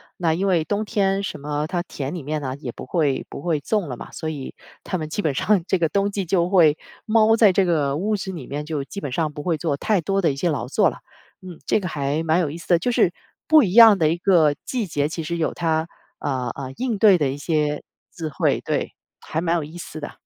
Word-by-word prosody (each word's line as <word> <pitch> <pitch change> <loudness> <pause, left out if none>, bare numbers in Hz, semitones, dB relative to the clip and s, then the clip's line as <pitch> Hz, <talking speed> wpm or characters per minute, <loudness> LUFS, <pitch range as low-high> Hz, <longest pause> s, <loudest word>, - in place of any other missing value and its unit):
那 165 -3 +1
因 190 +4 -1
为 175 -4 +2
冬 205 +5 -2
天 195 -2 +1
什 150 - -5
么 150 +1 -2
它 175 -1 -2
田 140 -3 -5
里 165 - -6
面 150 +1 -3
呢 130 -2 -4
也 130 -5 -6
不 - - -9
会 145 -2 0
不 - - -8
会 160 -2 0
种 200 0 -1
了 125 - -5
嘛。 - - -9
所 160 - -4
以 145 -4 -6 0.3
他 185 - -2
们 155 -1 -5
基 205 - -2
本 145 -7 -1
上 195 0 +2
这 190 - +2
个 165 -3 +1
冬 200 +3 +1
季， 200 -1 -3
就 175 0 +1
会 160 -6 +5 0.3
猫 220 0 +4
在 220 -3 +6
这 190 +1 +2
个 150 -5 +1
屋 210 +5 0
子 190 -1 -4
里 160 -8 -8
面， 145 +2 -4
就 150 -3 -3
基 200 - -7
本 140 - -4
上 155 +1 -1
不 145 -1 -7
会 170 -3 0
做 160 -3 -1
太 200 +7 +1
多 195 +4 0
的 165 - +2
一 135 - -6
些 170 +4 0
劳 145 - -2
作 - - +3
了， - - -10 0.4
嗯。 180 -3 -10
这 215 - +1
个 180 - -3
还 145 +1 -1
蛮 160 +2 +2
有 160 -5 0
意 160 - -7
思 170 - -13
的， 170 -1 +5
就 245 - -1
是 215 -8 +3 0.3
不 310 -1 +6
一 190 -5 0
样 225 -3 +9
的 155 - +3
一 160 - +2
个 170 -6 +3
季 240 -6 -2
节， 145 -2 -1
其 165 - -4
实 170 +2 -3
有 165 - -1
它， 160 -1 0 0.3
呃 130 -4 -2
呃， 130 -2 -6
应 245 -5 -1
对 200 -3 +6
的 150 - +1
一 140 - -4
些 150 -1 -1 0.3
智 160 -3 -4
慧， - - 0
对， - - -2 0.3
还 160 - -3
蛮 170 0 +1
有 160 - -2
意 155 +4 -10
思 160 -2 -8
的。 145 - -6
165 Hz, 280 characters per minute, -22 LUFS, 150-195 Hz, 0.4 s, 样